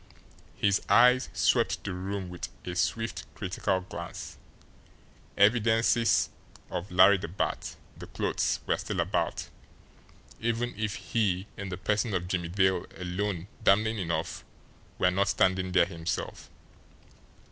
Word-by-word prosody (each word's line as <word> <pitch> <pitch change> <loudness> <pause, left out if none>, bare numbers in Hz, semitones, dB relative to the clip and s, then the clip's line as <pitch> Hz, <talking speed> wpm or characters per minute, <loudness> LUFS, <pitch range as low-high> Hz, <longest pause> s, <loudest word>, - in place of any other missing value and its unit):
His 100 -1 +2
eyes 125 +2 +5
swept - - +1
the 100 - -3
room 95 +1 -4
with 90 -1 -6 0.2
a 90 - -4
swift, 115 +5 -1
critical 95 - -1
glance 90 - -7 1.0
evidences 115 +2 +3 0.4
of 90 +3 -4
Larry 95 +2 +6
the - - -5
Bat, 90 +4 -3 0.2
the - - -10
clothes, - - -1
were - - +1
still - - -4
about, - - -1 0.9
even 120 +1 -1
if 105 0 -2
he 95 -5 0
in 100 -1 -6
the 90 - -4
person 105 +2 0
of 90 -1 -2
Jimmie 90 -2 -1
Dale, 95 -1 +2
alone 90 0 -3 0.2
damning 110 +3 +3
enough, 85 -3 -2 0.5
were 90 - +3
not 100 +2 +1
standing 95 -1 +2
there 90 -2 +5
himself. 85 0 -4
95 Hz, 125 wpm, -29 LUFS, 90-110 Hz, 1.0 s, Larry